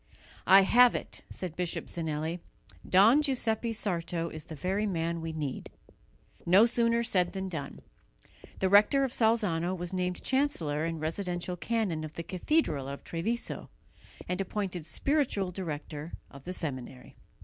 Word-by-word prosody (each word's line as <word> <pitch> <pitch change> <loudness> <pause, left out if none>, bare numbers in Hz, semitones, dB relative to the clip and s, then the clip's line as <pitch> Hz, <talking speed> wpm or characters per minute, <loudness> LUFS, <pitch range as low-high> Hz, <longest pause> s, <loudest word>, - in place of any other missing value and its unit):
"I 195 +1 +9
have 245 +5 +6
it!" - - -6
said 180 -4 -6
Bishop 180 -1 -2
Zinelli, 160 +1 -3 0.5
"Don 220 +10 +6
Giuseppe 235 -5 0
Sarto 170 -5 -1
is 155 -2 -7
the 160 - -8
very 190 +7 -1
man 170 -2 -1
we 165 0 -4
need." 150 -4 -4 0.7
No 190 +6 +6
sooner 235 0 +2
said 180 -6 +1
than 190 -1 -3
done. 145 -6 -6 0.8
The 190 - +1
rector 210 +8 +5
of 265 - -1
Salzano 195 -7 +2
was 175 +1 -5
named 180 -1 -2
chancellor 170 - 0
and 165 -1 -3
residential 175 +2 -3
canon 190 -5 -1
of 155 0 -7
the 170 - -4
cathedral 170 - 0
of 140 0 -7
Treviso, 220 +9 -3 0.6
and 180 +1 -1
appointed 185 -4 -3
spiritual 245 - 0
director 155 -3 -6 0.2
of 140 -1 -13
the 180 - -4
seminary. 130 - -6
180 Hz, 145 wpm, -30 LUFS, 160-215 Hz, 0.8 s, I